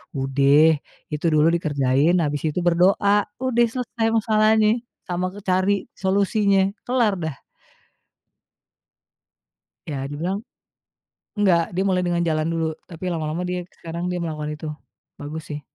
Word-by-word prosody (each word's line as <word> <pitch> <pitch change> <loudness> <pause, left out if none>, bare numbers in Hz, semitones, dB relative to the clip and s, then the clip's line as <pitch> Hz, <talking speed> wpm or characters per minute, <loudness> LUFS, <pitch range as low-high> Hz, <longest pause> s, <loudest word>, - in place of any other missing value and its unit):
"Udeh 140 +3 +4 0.3
itu 150 +2 -4
dulu 155 +1 +4
dikerjain 145 0 +2
habis 145 -1 -2
itu 155 +4 -1
berdoa, 195 +4 +3 0.2
udeh 240 -2 +3
selesai 245 -3 -2
masalahnye 215 0 +3 0.4
sama 180 0 -1
ke - - -8
cari 185 +2 +3 0.3
solusinya, 195 0 +2 0.2
kelar 245 -4 +2
dah." 160 -4 -3 2.5
Ya 140 -3 -3
dibilang 180 +8 -3 1.0
nggak 185 -5 +4
dia 190 - +1
mulai 185 -2 +1
dengan 175 -1 0
jalan 155 -1 0
dulu, 165 -1 -1 0.2
tapi 170 0 -9
lama-lama 160 +2 -3
dia 180 0 -2 0.2
sekarang 170 +1 -4
dia 180 - -2
melakukan 155 -3 -4
itu, 155 +1 -7 0.5
bagus 155 +2 -6
sih. 145 - -4
175 Hz, 125 wpm, -23 LUFS, 155-200 Hz, 2.5 s, Udeh